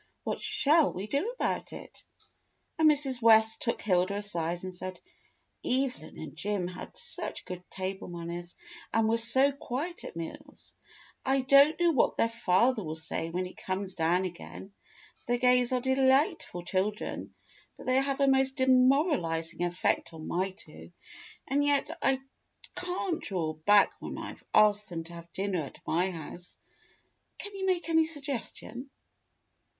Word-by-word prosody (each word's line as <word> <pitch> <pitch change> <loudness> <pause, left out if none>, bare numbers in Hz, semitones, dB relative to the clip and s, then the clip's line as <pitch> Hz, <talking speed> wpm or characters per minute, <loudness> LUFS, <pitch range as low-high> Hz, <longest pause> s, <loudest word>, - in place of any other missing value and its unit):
What - - -3
shall 325 -8 +3
we 190 +3 -5
do 280 - -1
about - - -2
it?" - - -11 0.8
And 315 -1 +7
Mrs. 275 -4 +1
West 220 -1 +5
took 235 - -1
Hilda 185 -1 +2
aside 175 -4 -2
and 185 0 -5
said: 185 +1 -6 0.6
"Evelyn 255 - -2
and 155 -3 -8
Jim 200 -3 -2
had 180 0 -8
such - - -1
good 180 -1 -7
table 190 0 -5
manners 175 0 -6 0.4
and 225 -1 +2
were 225 +1 +2
so 260 +5 +3
quiet 280 +5 -5
at - - -8
meals. 165 -1 -8 0.5
I 270 0 +2
don't 280 +4 +6
know 345 -1 +4
what 275 - +2
their 230 - +3
father 230 +1 +2
will 155 -1 -4
say 160 +1 -3
when 180 +2 -2
he 180 - -8
comes 190 0 -4
down 175 +3 +1
again. 185 +2 -8 0.5
The 245 0 +2
Gays 250 0 +3
are 255 - +2
de 265 +1 +1
lightful 265 - +2
children, 195 +4 -2 0.4
but - - -11
they 255 +1 +3
have 275 0 -1
a 275 - +4
most 265 0 +3
demoralizing 255 - +2
effect 175 -1 0
on 160 -1 -8
my 185 +3 0
two. 190 - -13 0.6
And 285 +2 +2
yet 285 +1 +1
I 270 0 +2 0.5
can't 360 -1 -2
draw 170 -6 -2
back 200 +7 +4
when - - -6
I've - - -8
asked 210 -1 +4
them 165 -2 -4
to 170 +1 -12
have 170 0 -11
dinner 190 -3 -1
at 140 - -8
my 180 +4 +1
house. 175 +1 -9 0.8
Can 410 0 -7
you 385 -1 -2
make 360 -2 +1
any 320 -1 +4
suggestion. 275 -4 -5
220 Hz, 155 wpm, -29 LUFS, 180-270 Hz, 0.8 s, And